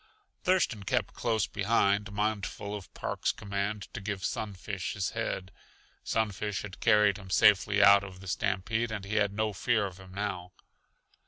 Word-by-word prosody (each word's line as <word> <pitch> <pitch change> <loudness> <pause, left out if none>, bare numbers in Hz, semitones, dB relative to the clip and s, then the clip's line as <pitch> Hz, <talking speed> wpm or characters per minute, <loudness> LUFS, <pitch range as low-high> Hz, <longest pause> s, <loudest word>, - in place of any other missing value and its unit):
Thurston 180 - +2
kept 110 +1 -1
close 110 -3 0
behind, 100 0 +1
mindful 105 0 -2
of 100 -3 -9
Park's - - -1
command 100 +1 -3
to 110 - -5
give 100 -2 -3
Sunfish 100 -2 -3
his 100 -2 -2
head. 95 -4 -3 0.5
Sunfish 105 -2 -1
had 100 -2 -9
carried 105 -3 +4
him 95 -2 -11
safely 105 +1 +5
out 100 0 +8
of 95 -2 -9
the 95 - -11
stampede 110 +4 -1
and 105 -3 -4
he 105 +2 -2
had 105 -2 +3
no 110 +1 -1
fear 105 +2 +1
of 95 -1 -7
him 95 -1 -13
now. 95 -3 -4
100 Hz, 160 wpm, -30 LUFS, 95-110 Hz, 0.5 s, out